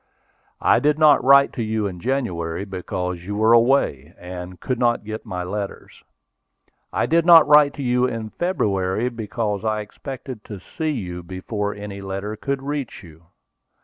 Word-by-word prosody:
"I - - +5
did 150 0 +2
not 155 -3 +5
write 140 +1 +6
to 120 - -4
you 110 -1 -1
in 90 -3 -5
January 95 -8 -2
because 90 -2 -4
you 100 +3 -5
were 110 +2 +4
away, 115 - +2
and 90 0 -8
could 125 +5 -3
not 120 -2 +1
get 110 +2 -7
my 90 -3 -4
letters. 100 +2 -6 0.9
I - - 0
did 165 +1 +3
not 165 -2 +8
write 150 -1 +6
to 140 - -5
you 125 0 +2
in 115 -3 -5
February, 105 - -1
because 110 -3 -3
I 110 -1 0
expected 125 +2 -8
to 105 -3 -8
see 155 - -4
you 90 -11 -4
before 100 +4 -4
any 100 -1 -7
letter 100 +2 -4
could 135 +4 -3
reach 140 -6 -4
you. 80 -1 -16
110 Hz, 165 wpm, -22 LUFS, 95-130 Hz, 0.9 s, not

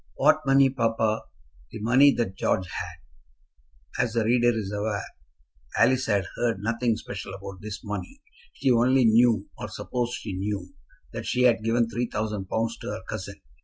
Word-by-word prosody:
"What - - +4
money, 135 0 +5
papa?" 115 -3 0 0.5
"The 110 - -7
money 125 +6 +6
that 115 -6 -1
George 95 0 0
had." 65 - -8
As 115 -2 -3
the 115 -2 +1
reader 120 +2 +3
is 110 -4 -3
aware, 105 -1 -2 0.7
Alice 130 0 +3
had 100 -3 +1
heard 115 -3 +1
nothing 115 +2 0
special 100 -3 -7
about 95 -1 -9
this 105 0 -7
money. 105 - -6 0.3
She 135 -1 +1
only 125 +2 +4
knew, 115 -2 +4
or - - -4
supposed 120 -1 -3
she 105 - -6
knew, 95 -1 -4 0.4
that - - -5
she 125 - +1
had 115 -3 +4
given 115 +1 +2
three 120 +2 -2
thousand 105 -3 -3
pounds 115 +1 -1
to - - -8
her 95 - -5
cousin. 100 -2 -6
110 Hz, 165 wpm, -26 LUFS, 100-120 Hz, 0.7 s, money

